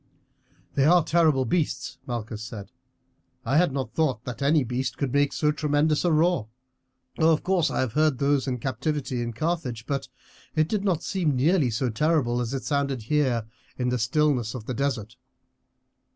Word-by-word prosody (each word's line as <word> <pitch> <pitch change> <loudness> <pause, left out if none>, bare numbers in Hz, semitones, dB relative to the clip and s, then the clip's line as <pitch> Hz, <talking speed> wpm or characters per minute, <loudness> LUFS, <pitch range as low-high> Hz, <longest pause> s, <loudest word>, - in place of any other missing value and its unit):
"They 135 - +2
are 175 +2 +5
terrible 155 -4 +3
beasts," 160 +5 -1
Malchus 115 -3 -4
said. 110 -3 -8 0.7
"I 135 - +2
had 175 -2 +4
not 135 -1 -4
thought 135 -8 0
that 125 -1 -6
any 145 +1 +3
beast 125 +1 -3
could 140 -3 -2
make 145 0 +3
so 150 -1 +1
tremendous 150 0 +1
a 175 - +2
roar. 160 -6 +2 0.7
Of 160 -1 +3
course 185 -3 +2
I - - -1
have 125 -4 -2
heard 155 -2 +2
those 140 0 +1
in 125 -1 -1
captivity 130 +1 -2
in 120 0 -3
Carthage, 125 -3 -3
but 140 0 -2 0.5
it 155 0 +3
did 205 +1 -1
not 180 -5 0
seem 170 -8 0
nearly 150 +1 +3
so 125 +2 -1
terrible 125 -2 +1
as 120 -1 -3
it 135 -1 -3
sounded 140 -4 -1
here 125 -3 +1 0.3
in 125 -1 0
the 125 0 0
stillness 125 -1 +1
of 115 -4 -7
the 130 - -3
desert." 125 -4 -2
140 Hz, 175 wpm, -26 LUFS, 125-155 Hz, 0.7 s, are